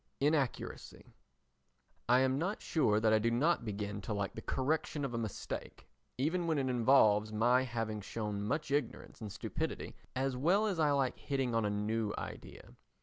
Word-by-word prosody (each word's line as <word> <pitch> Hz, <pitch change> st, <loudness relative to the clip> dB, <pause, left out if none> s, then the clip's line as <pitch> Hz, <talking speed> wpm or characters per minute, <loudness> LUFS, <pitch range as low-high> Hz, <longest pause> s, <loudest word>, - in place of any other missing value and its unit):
Inaccuracy 145 Hz, -3 st, -1 dB, 1.0 s
I 125 Hz, +1 st, +6 dB
am 130 Hz, +1 st, +2 dB
not 190 Hz, +6 st, -1 dB
sure 110 Hz, -10 st, +2 dB
that 110 Hz, 0 st, +3 dB
I 110 Hz, -, +5 dB
do 115 Hz, +2 st, +2 dB
not 130 Hz, +5 st, +2 dB
begin 105 Hz, -1 st, -4 dB
to 105 Hz, -, -3 dB
like 100 Hz, -1 st, -2 dB
the -, -, -7 dB
correction 145 Hz, +1 st, -1 dB
of 130 Hz, -, -4 dB
a -, -, -1 dB
mistake, 110 Hz, -3 st, -6 dB, 0.3 s
even 165 Hz, +6 st, 0 dB
when 160 Hz, -2 st, +1 dB
it 135 Hz, -2 st, 0 dB
involves 110 Hz, -4 st, +4 dB
my 120 Hz, +4 st, +3 dB
having 115 Hz, -4 st, -3 dB
shown 105 Hz, 0 st, -4 dB
much 140 Hz, +8 st, -2 dB
ignorance 145 Hz, -4 st, -2 dB
and 105 Hz, -2 st, -5 dB
stupidity, 130 Hz, +9 st, -4 dB, 0.2 s
as 130 Hz, 0 st, 0 dB
well 175 Hz, +11 st, +3 dB
as 195 Hz, -6 st, -1 dB
I 155 Hz, -2 st, +4 dB
like 135 Hz, -3 st, +1 dB
hitting 135 Hz, -4 st, -1 dB
on 115 Hz, -1 st, +2 dB
a -, -, +1 dB
new 105 Hz, +1 st, -1 dB
idea. -, -, -8 dB
125 Hz, 175 wpm, -34 LUFS, 110-145 Hz, 1.0 s, I